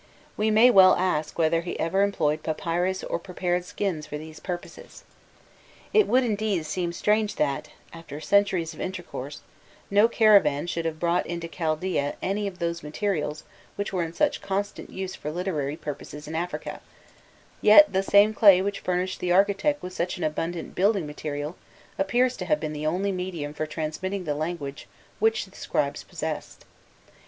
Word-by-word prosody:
We 215 +1 +1
may 220 +4 +6
well 190 -4 +8
ask 155 -5 -1
whether 165 0 +2
he 175 - -5
ever 190 +4 +1
employed 160 -7 +1
papyrus 175 +3 -1
or - - -2
prepared 180 0 -2
skins 180 -6 -3
for 150 - -5
these 155 +1 -10
purposes. 180 - -8 0.9
It 430 -2 +5
would, 255 +1 +4
indeed, 210 -7 -1
seem 175 +2 -2
strange 210 +4 +1
that, 140 -2 -1 0.2
after 165 -3 -9
centuries 185 -2 +2
of 155 - -9
intercourse, 175 -7 -6 0.5
no 205 +3 +6
caravan 200 -11 +4
should 170 -1 -3
have 160 -1 -3
brought 170 +1 +1
into 170 -1 -4
Chaldaean 160 -2 -1
any 200 +2 -1
of 190 -2 -7
those 170 -1 -2
materials 155 -2 -2 0.3
which 205 0 -4
were 185 - 0
in 165 -1 -3
such 295 +10 +1
constant 200 +1 -3
use 190 0 -5
for 150 - -6
literary 155 -4 -2
purposes 150 -1 -7
in 155 - -6
Africa;* 175 +2 -4 0.8
yet 205 -1 +8
the 190 - +3
same 205 +2 +5
clay 200 -4 +7
which 200 +1 -2
furnished 185 +1 -2
the 180 - -1
architect 200 +10 +2
with 180 0 -6
such 175 +1 -2
an 180 - -4
abundant 165 +2 -3
building 195 -1 +2
material 150 +1 -5 0.4
appears 245 +6 +2
to 180 - -4
have 150 -4 +2
been 155 0 -4
the 150 0 -3
only 190 +5 0
medium 180 -6 -4
for 155 +1 -3
transmitting 180 +5 -3
the 150 -4 -1
language 150 -2 -4 0.3
which 445 0 +2
the - - -19
scribes - - -2
possessed. - - -6
180 Hz, 165 wpm, -26 LUFS, 155-200 Hz, 0.9 s, well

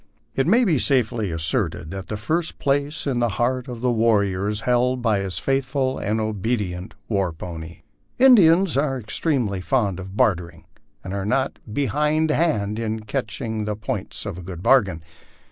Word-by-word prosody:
It 135 +2 0
may 235 +7 +4
be 160 - +2
safely 120 -6 +1
asserted 80 0 -1
that 95 -1 -6
the 110 - -4
first 160 +10 -1
place 145 +2 0
in 130 -4 0
the 120 -1 +2
heart 125 +2 0
of 120 -2 -7
the 125 -1 +2
warrior 105 -4 +2
is 105 +1 -1
held 125 +1 +1
by 110 -4 +2
his 95 -2 -2
faithful 135 0 0
and 110 +2 -1
obedient 105 -3 -2
war 100 -5 0
pony. 80 0 -8 0.3
Indians 195 - +6
are 135 -1 +1
extremely 115 - -1
fond 100 -5 0
of 95 +2 -8
bartering, 90 -9 0 0.4
and 95 - -6
are 100 -1 -2
not 130 +6 0
behindhand 150 -4 +1
in 110 -1 -2
catch 105 0 -3
ing 110 -3 -3
the 105 0 -2
points 105 -2 -4
of 95 -4 -5
a - - -7
good 90 0 -8
bargain. 95 -11 +3
110 Hz, 165 wpm, -23 LUFS, 100-135 Hz, 0.4 s, Indians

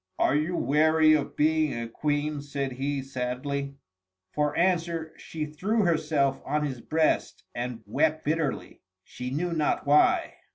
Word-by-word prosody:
"Are - - +2
you 155 +4 0
weary 155 +3 +4
of 150 -2 0
being 155 -4 +2
a 115 - -4
Queen?" 145 +4 -1
said 140 -1 -3
he, 135 +2 -2
sadly. 135 +2 -3 0.6
For 150 0 0
answer 170 -2 0
she 155 -2 -5
threw 195 +9 0
herself 150 -5 +1
on 150 +2 -1
his 130 -4 -5
breast 160 0 0
and 120 -2 -5
wept 155 +8 0
bitterly, 155 -1 -2 0.2
she 125 0 -7
knew 170 +6 -2
not 155 -2 0
why. 145 +1 +3
150 Hz, 140 wpm, -27 LUFS, 140-160 Hz, 0.6 s, weary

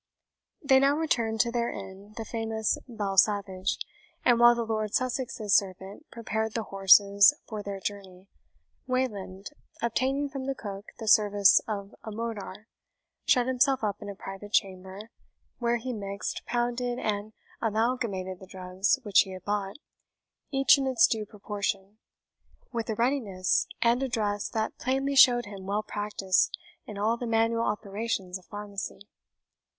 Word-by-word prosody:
They 265 -2 +5
now 280 +2 +3
returned 230 -8 +1
to 235 - 0
their 235 0 0
inn 195 +2 -9
(the 225 - -4
famous 220 -1 -1
Bell 205 -5 -4
Savage); 195 -2 +2 0.5
and 240 -1 +5
while 240 0 +7
the 235 -1 -2
Lord 215 -1 -2
Sussex's 250 -5 -1
servant 195 - -1
prepared 220 -1 -3
the 225 - -1
horses 200 +4 +6
for 215 -2 -5
their 200 -1 -5
journey, 190 -1 -7 0.6
Wayland, 205 -6 -3 0.3
obtaining 265 +5 0
from 270 -1 -6
the 275 - -1
cook 200 -3 -7
the 220 - -7
service 205 -2 +5
of 200 -2 -5
a 220 - -6
mortar, 215 -2 -6 0.6
shut 250 -2 +4
himself 260 0 +2
up 205 0 -2
in 205 - -7
a 200 - -6
private 195 +2 -9
chamber, 190 +2 -2 0.5
where 240 -1 +1
he 250 +2 -5
mixed, 200 -2 -5
pounded, 245 0 -1
and 215 -1 -3 0.3
amalgamated 220 -5 -1
the 190 - -12
drugs 185 +4 0
which 205 -4 +4
he 190 - +2
had 185 -1 -10
bought, 205 -1 -2 0.7
each 275 0 +5
in 270 - -1
its 265 +6 +5
due 220 -9 -1
proportion, 200 -1 -4 0.7
with 230 -2 -3
a 220 - -1
readiness 235 - +1 0.2
and 235 +2 +3
address 215 -5 -1
that 220 -1 -3
plainly 270 +2 0
showed 245 -3 +7
him 195 -2 -9
well 205 +2 -1
practised 205 -3 0 0.3
in 210 - -7
all 220 +3 +1
the 240 - -5
manual 230 0 +2
operations 205 -3 -3
of 180 - -23
pharmacy. 205 -1 -7
215 Hz, 150 wpm, -28 LUFS, 200-240 Hz, 0.7 s, while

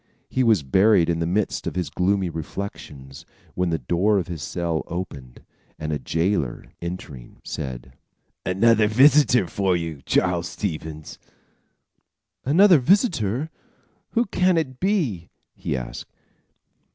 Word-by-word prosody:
He 130 - +1
was 110 - +3
buried 95 +4 +4
in 85 - -1
the 85 - -1
midst 100 +4 -1
of - - -4
his 90 -1 -2
gloomy 95 +1 +1
reflections, 75 -5 -7 0.3
when 90 -1 0
the 80 - 0
door 90 - +1
of 90 -2 -2
his 85 -4 -5
cell 85 +1 -2
opened, 70 -9 -7 0.3
and 75 0 -3
a 75 - -2
jailer, 80 -1 -1 0.2
entering, 85 -8 -8
said: 65 -1 -6 0.5
"Another 110 +3 +3
visitor 130 -1 +5
for 95 0 0
you, 80 -4 -5
Charles 90 -1 +1
Stevens." 80 -5 -5 1.2
"Another 175 +4 +6
visitor? 150 - +1 0.6
Who 235 +1 +2
can 185 -3 +2
it 130 -6 -2
be?" 155 - 0 0.2
he - - -3
asked. - - -7
90 Hz, 125 wpm, -23 LUFS, 80-115 Hz, 1.2 s, Another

